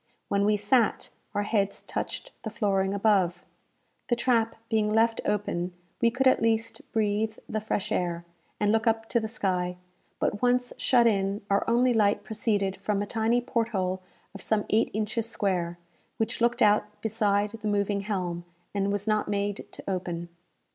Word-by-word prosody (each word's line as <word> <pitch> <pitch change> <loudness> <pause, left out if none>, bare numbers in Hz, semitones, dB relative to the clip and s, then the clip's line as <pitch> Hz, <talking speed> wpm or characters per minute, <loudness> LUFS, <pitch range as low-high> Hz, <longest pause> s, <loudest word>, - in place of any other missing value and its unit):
When 200 0 +2
we 210 0 +3
sat, 215 +3 +2 0.2
our 205 - +1
heads 205 -2 0
touched - - -4
the 220 - -4
flooring 195 -4 +1
above. 195 -4 +2 0.6
The 240 - +2
trap 230 -2 +1
being 215 -2 +1
left 225 +1 +3
open, 185 -4 -1 0.3
we 235 - +5
could 255 +3 -1
at 260 - +5
least 225 0 0
breathe 215 0 0
the 215 - -2
fresh 210 -1 -2
air, 175 -4 -1 0.3
and 205 0 +2
look 225 +1 +1
up 225 0 +1
to 235 - +3
the 220 - -3
sky; 180 -4 -1 0.4
but, 205 - -1
once 245 0 +2
shut 245 -2 +4
in, 200 -2 +1
our 200 - +3
only 245 +2 +4
light 210 -3 +2
proceeded 205 -3 -1
from 200 +1 -1
a - - -3
tiny 225 +3 +1
port 235 -2 0
hole 185 -3 -1 0.3
of 195 - -8
some 215 +1 +1
eight 220 +2 +3
inches 215 +2 -2
square, 180 -6 -1 0.4
which 225 0 -2
looked 240 +1 +3
out 210 0 +2
beside 210 -2 +1
the 215 - -2
moving 205 -1 +1
helm, 180 -4 -3 0.3
and 200 0 0
was 205 0 -1
not 215 -1 +1
made 205 0 -2
to - - -9
open. 175 -3 -3
210 Hz, 170 wpm, -27 LUFS, 195-225 Hz, 0.6 s, we